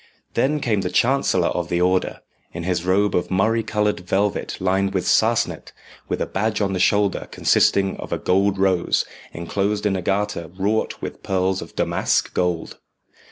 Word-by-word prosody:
Then 140 +5 +1
came 110 -6 +1
the - - -2
chancellor 120 -9 +2
of 85 -1 -3
the 85 - 0
Order, 90 +1 +1 0.3
in 85 - -5
his 90 -1 -1
robe 100 +2 +2
of 90 - 0
murrey 110 +5 +2
coloured 105 -1 0
velvet 95 +2 -1
lined 95 +1 0
with 90 - 0
sarcenet, 110 -7 +1 0.4
with - - -1
a - - 0
badge 110 +2 -1
on 100 -2 0
the 90 - -1
shoulder 100 +1 +2
consisting 95 -1 +2
of - - -8
a - - 0
gold 100 +1 +1
rose, 95 -2 +2 0.3
enclosed 100 +5 -2
in 100 -2 +2
a 95 - -2
garter 100 -2 -1
wrought 105 +3 -1
with - - -6
pearls 95 0 0
of - - -10
damask - - 0
gold. 90 -2 -2
95 Hz, 170 wpm, -22 LUFS, 90-105 Hz, 0.4 s, chancellor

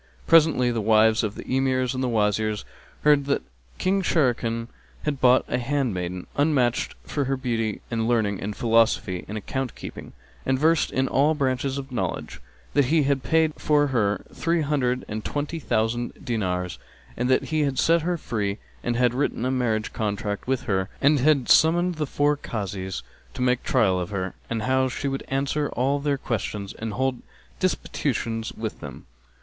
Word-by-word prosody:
Presently 155 -7 +5
the 115 -2 -1
wives 110 +1 +4
of 105 -1 -2
the - - -7
Emirs 130 -1 +1
and 130 0 -2
Wazirs 110 -2 0 0.4
heard 150 -2 +5
that 140 - 0 0.3
King 195 +1 +1
Sharrkan 120 -9 +1 0.4
had 145 -3 -2
bought 125 0 +5
a - - -1
handmaiden 105 -10 -2
unmatched 140 -5 +1
for 145 -2 -2
her 135 +1 0
beauty 115 -4 -2
and 115 -1 0
learning 110 -5 +1
and 105 +1 -4
philosophy 115 -5 +2
and 105 - -4
account 130 +4 -3
keeping, - - -9 0.3
and 130 0 +1
versed 160 +2 +3
in 130 0 +1
all 145 +5 +3
branches 135 -1 0
of 135 -1 -6
knowledge, 120 - -3 0.3
that 140 - +4
he 155 +3 +3
had 140 -1 +1
paid 160 0 +2
for 150 -1 +3
her 105 -4 +1
three 170 0 0
hundred 130 -4 0
and 110 0 -4
twenty 150 +3 -3
thousand 120 -2 0
dinars, 90 -7 -2 0.4
and 125 +1 -1
that 130 - +2
he 155 - +2
had 140 -3 0
set 165 0 +4
her 175 +2 -1
free 105 -8 -2 0.3
and 120 - 0
had 120 0 +3
written 130 -2 -1
a 130 - +1
marriage 115 -4 0
contract 105 0 -3
with 130 -1 0
her 95 -4 0
and 145 +1 +4
had 140 -2 +3
summoned 175 +3 +5
the 150 -2 -1
four 145 +2 +2
Kazis 100 -8 -4 0.3
to - - -2
make 125 0 +2
trial 95 -4 +2
of 90 - -3
her, 95 -2 -3 0.2
how 130 +4 +1
she 135 +2 -3
would 135 0 -2
answer 140 +2 0
all 135 +3 +1
their 140 -1 0
questions 105 -5 -3
and 110 -1 -5
hold 130 +1 -1 0.4
disputetion 115 -1 -1
with 110 -1 -4
them. - - -9
125 Hz, 170 wpm, -25 LUFS, 110-140 Hz, 0.4 s, Presently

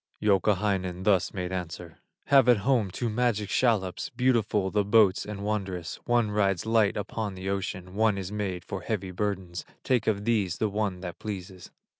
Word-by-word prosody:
Youkahainen 95 -3 +1
thus 95 -2 +3
made 90 -2 -4
answer: 90 -2 -6 0.3
"Have 135 -3 +5
at 120 - +6
home 125 -7 +2
two 120 +6 -3
magic 110 -2 0
shallops, 105 -7 +1
Beautiful 110 -6 +1
the 105 -1 +2
boats 105 -2 +4
and 105 -1 -5
wondrous; 95 -5 -3
One 120 -3 +2
rides 100 -3 +1
light 110 -2 +2
upon 105 -1 -3
the 95 +1 -5
ocean, 95 -1 -4
One 105 0 +2
is 95 0 -5
made 95 -4 -3
for - - -5
heavy 95 -1 -3
burdens; 95 -2 -3 0.2
Take 125 -4 +1
of 105 -2 0
these 105 -6 +1
the 110 - 0
one 100 -3 -2
that 90 -2 -7
pleases." 95 -3 -7
100 Hz, 170 wpm, -27 LUFS, 95-110 Hz, 0.3 s, at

